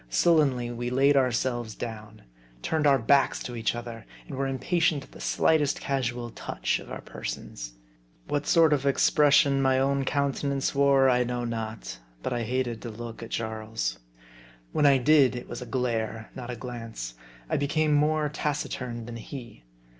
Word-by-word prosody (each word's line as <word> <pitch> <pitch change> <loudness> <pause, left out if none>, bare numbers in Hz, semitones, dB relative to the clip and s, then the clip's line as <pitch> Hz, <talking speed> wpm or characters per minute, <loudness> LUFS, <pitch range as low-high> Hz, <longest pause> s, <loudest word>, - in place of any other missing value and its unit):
Sul 165 - +4
lenly 125 -5 +1
we 120 +1 -3
laid 135 +3 +4
ourselves 120 -3 0
down; 110 -2 -7 0.4
turned 155 -2 +1
our 140 -1 +6
backs 135 +3 +3
to 120 - -6
each 115 0 -1
other; 120 -1 -7 0.2
and - - -6
were 135 +1 -1
impatient 150 +2 +1
of - - -18
the - - -12
slightest 150 -3 +2
casual 120 -3 -2
touch - - -2
of - - -12
our - - -6
persons. - - -7 0.5
What 145 0 -1
sort 165 -3 +5
of 140 -1 0
expression 140 0 +4
my 130 -1 +3
own 135 +1 +1
counte 140 +1 -1
nance 140 -1 0
wore, 140 -1 +4
I 125 -1 +4
know 120 0 -2
not; 110 - -5 0.2
but - - -1
I 120 - -1
hated 120 0 -2
to 120 - -6
look 115 +1 -8
at 115 - -7
Jarl's. 110 - -3 0.7
When 150 - +3
I 140 -1 +6
did 135 -1 +4
it 125 - -6
was 120 - -6
a 125 - -7
glare, 115 -3 -2
not 125 -2 -7
a 125 - -3
glance. 115 - -6 0.3
I - - -1
became 150 +2 +1
more 150 +1 +2
taciturn 130 -5 -3
than 120 0 -7
he. 115 - -9
125 Hz, 175 wpm, -27 LUFS, 115-140 Hz, 0.7 s, our